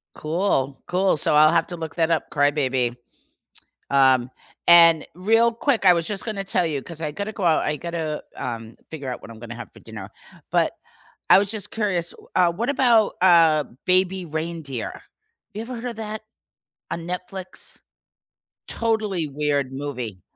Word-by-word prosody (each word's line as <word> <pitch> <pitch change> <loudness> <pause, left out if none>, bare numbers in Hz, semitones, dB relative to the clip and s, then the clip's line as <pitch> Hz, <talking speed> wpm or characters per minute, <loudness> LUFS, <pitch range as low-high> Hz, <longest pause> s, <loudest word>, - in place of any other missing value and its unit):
Cool. 155 -5 -1
Cool, 185 0 +2
so 150 - +2
I'll 155 +1 +6
have 165 -1 +2
to 175 - -6
look 160 -1 -7
that 165 0 +1
up, 165 - 0
Cry-Baby. 130 -4 +1 0.9
Um, 130 -2 +4 0.4
and 165 -2 +7
real 225 +6 +3
quick, 235 -2 0
I 180 - +8
was 165 -1 0
just 205 -2 -3
gonna 210 -4 -3
tell 185 -2 +1
you, 145 -4 -2
'cause 165 +1 -9
I 155 - -2
gotta 205 +5 -5
go 210 -4 -5
out, 165 -2 +3
I 150 - -1
gotta, 160 -1 -4
um, 115 -2 -6
figure 140 -5 -6
out - - -7
what - - -12
I'm 115 - -11
gonna 120 +1 -8
have 120 - -9
for - - -16
dinner. - - -9 0.4
But, - - +2 0.6
I - - +9
was 200 0 0
just 215 -3 -2
curious, 185 -6 -1
w - - -13
uh, 175 -2 +3
what 235 +10 -2
about, 240 -6 +3
uh, 165 -4 +5 0.2
Baby 185 0 +3
Reindeer? 155 -5 -4
Have - - -13 0.5
you 215 - -4
ever 245 +1 -6
heard 230 - -8
of 230 - -9
that 215 -1 -5 0.7
on 170 - -3
Netflix? 180 +1 -4 0.9
Totally 215 -7 +1
weird 145 -2 -1
movie. 125 -9 -6
170 Hz, 175 wpm, -23 LUFS, 145-195 Hz, 0.9 s, I